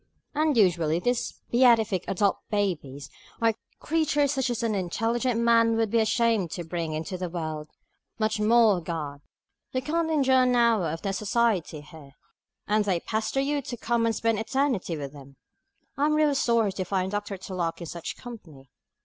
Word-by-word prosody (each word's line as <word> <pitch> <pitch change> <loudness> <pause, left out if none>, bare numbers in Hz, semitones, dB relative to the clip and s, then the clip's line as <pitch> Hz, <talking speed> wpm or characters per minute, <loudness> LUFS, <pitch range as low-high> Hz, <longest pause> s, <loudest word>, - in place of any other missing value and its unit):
And 300 -2 +1
usually 170 -6 +3
these 245 +7 -2
beatific 225 -6 +4
adult 195 0 +1
babies 165 -10 -2 0.3
are 230 -1 +3 0.3
creatures 300 -3 +1
such 265 -3 0
as 240 -1 -2
an 225 -2 0
intelligent 225 +6 -1
man 230 -1 +4
would 225 -2 0
be 230 - +3
ashamed 220 -4 +2
to 175 - -4
bring 165 -1 -4
into 165 +4 -4
the 180 -1 -3
world, 155 -3 -5 0.5
much 215 -1 0
more 215 -2 +4
a - - -10
God. 150 -4 -5 0.5
You 255 - 0
can't 325 +3 0
endure 265 -4 +3
an 250 -1 +3
hour 230 -8 +3
of 165 +4 -5
their 195 -1 -1
society 205 -7 0
here, 150 -2 -14 0.5
and 210 +1 +2
they 190 -4 0
pester 220 +7 -1
you 285 +1 0
to 245 -2 -6
come 230 0 0
and 225 - 0
spend 225 -2 0
eternity 230 - -1
with 140 -1 -6
them! 140 -1 -13 0.6
I 290 +2 +2
am 305 - +2
really 305 -1 +3
sorry 235 -6 +2
to 190 0 -3
find 190 0 -1
Dr. 205 -1 -3
Tulloch 180 -3 -4
in 170 - -6
such 170 +1 -6
company. 160 - -12
215 Hz, 175 wpm, -26 LUFS, 175-240 Hz, 0.6 s, beatific